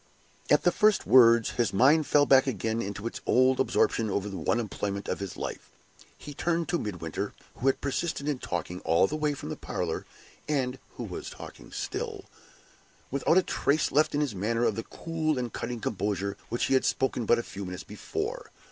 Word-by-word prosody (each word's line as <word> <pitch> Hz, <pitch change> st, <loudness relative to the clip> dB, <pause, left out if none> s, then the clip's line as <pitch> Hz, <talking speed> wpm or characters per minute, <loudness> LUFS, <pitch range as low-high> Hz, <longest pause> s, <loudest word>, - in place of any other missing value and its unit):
"At -, -, +5 dB
the -, -, +4 dB
first 215 Hz, -2 st, +3 dB
words, 115 Hz, -3 st, +6 dB
his 120 Hz, -3 st, 0 dB
mind 140 Hz, +9 st, +4 dB
fell 145 Hz, -1 st, +5 dB
back 135 Hz, -1 st, +5 dB
again 110 Hz, -1 st, -1 dB
into 100 Hz, 0 st, -5 dB
its 115 Hz, -, -4 dB
old 130 Hz, +1 st, +4 dB
absorption 115 Hz, -4 st, +2 dB
over 100 Hz, +1 st, -1 dB
the 100 Hz, -, -6 dB
one 90 Hz, +8 st, +1 dB
employment 100 Hz, -3 st, -3 dB
of -, -, -2 dB
his 100 Hz, -2 st, -6 dB
life. -, -, -6 dB, 0.5 s
He 145 Hz, -, -9 dB
turned 170 Hz, +3 st, 0 dB
to 175 Hz, -1 st, +1 dB
Midwinter 95 Hz, 0 st, -4 dB, 0.2 s
(who 130 Hz, -, -1 dB
had 135 Hz, -, +2 dB
persisted 140 Hz, +1 st, -2 dB
in 145 Hz, -4 st, -1 dB
talking 90 Hz, -6 st, -4 dB
all 85 Hz, +2 st, +3 dB
the 125 Hz, -, -3 dB
way 150 Hz, -1 st, 0 dB
from -, -, -7 dB
the -, -, -3 dB
parlor, -, -, -4 dB, 0.4 s
and 135 Hz, -3 st, 0 dB, 0.2 s
who -, -, -4 dB
was -, -, -6 dB
talking -, -, -11 dB
still) -, -, -4 dB, 0.9 s
without 140 Hz, +5 st, +2 dB
a 185 Hz, -, +5 dB
trace 150 Hz, -2 st, +1 dB
left 150 Hz, +1 st, +3 dB
in 145 Hz, -, +2 dB
his 140 Hz, -6 st, -1 dB
manner 115 Hz, +5 st, 0 dB
of -, -, +3 dB
the 115 Hz, -, -2 dB
cool 160 Hz, +2 st, -2 dB
and 120 Hz, -2 st, -3 dB
cutting 120 Hz, 0 st, -4 dB
composure 100 Hz, -1 st, -1 dB, 0.2 s
with -, -, -29 dB
which 120 Hz, -, 0 dB
he -, -, +1 dB
had 130 Hz, -, +4 dB
spoken 125 Hz, -4 st, 0 dB
but 120 Hz, -, +5 dB
a 120 Hz, -, -2 dB
few 100 Hz, -, -7 dB
minutes 90 Hz, -1 st, -6 dB
before. 415 Hz, -, -5 dB
125 Hz, 200 wpm, -28 LUFS, 105-145 Hz, 0.9 s, words